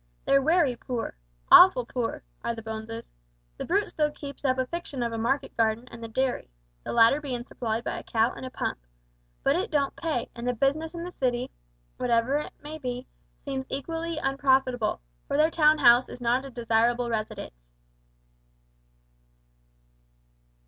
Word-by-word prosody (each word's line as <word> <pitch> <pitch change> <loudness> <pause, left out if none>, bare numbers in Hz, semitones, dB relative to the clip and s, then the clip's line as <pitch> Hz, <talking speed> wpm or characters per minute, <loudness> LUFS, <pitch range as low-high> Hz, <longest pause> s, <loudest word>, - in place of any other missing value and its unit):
They're 275 0 +4
wery 315 -3 +3
poor 240 0 -4 0.4
awful 360 -10 +9
poor 235 -1 -3 0.2
are 235 0 -1
the 225 - -8
Boneses. 220 +1 -6 0.5
The - - -4
Brute 400 +4 +1
still 300 -1 0
keeps 285 -1 -9
up 260 -2 +2
a 260 - +1
fiction 285 -4 -4
of 235 - -1
a - - -2
market 265 +5 -1
garden 225 +2 +1
and 230 0 -10
a - - -4
dairy 255 - -1 0.3
the - - -4
latter 235 +5 +5
bein' 250 -4 -4
supplied 230 -3 -3
by - - -3
a - - -11
cow 225 +2 +1
and - - -9
a 260 - -5
pump 255 - -3 0.6
but 275 - +3
it 380 +6 -1
don't 280 -3 0
pay, 310 -8 -2
and 235 +1 -5
the 250 - +2
business 310 +7 0
in 340 - -5
the 355 - -6
city, 250 -4 -1 0.5
whatever 245 +2 +2
it 300 - -7
may 310 +2 -7
be, 250 -2 -4 0.4
seems 270 -1 -3
equally 325 +4 -3
unprofitable, 265 - +1 0.3
for - - 0
their 310 +2 +4
town 310 -1 +5
house 240 -2 +6
is - - -9
not 245 +2 +1
a - - -7
desirable 235 0 +1
residence." - - -5
255 Hz, 170 wpm, -27 LUFS, 235-290 Hz, 0.6 s, awful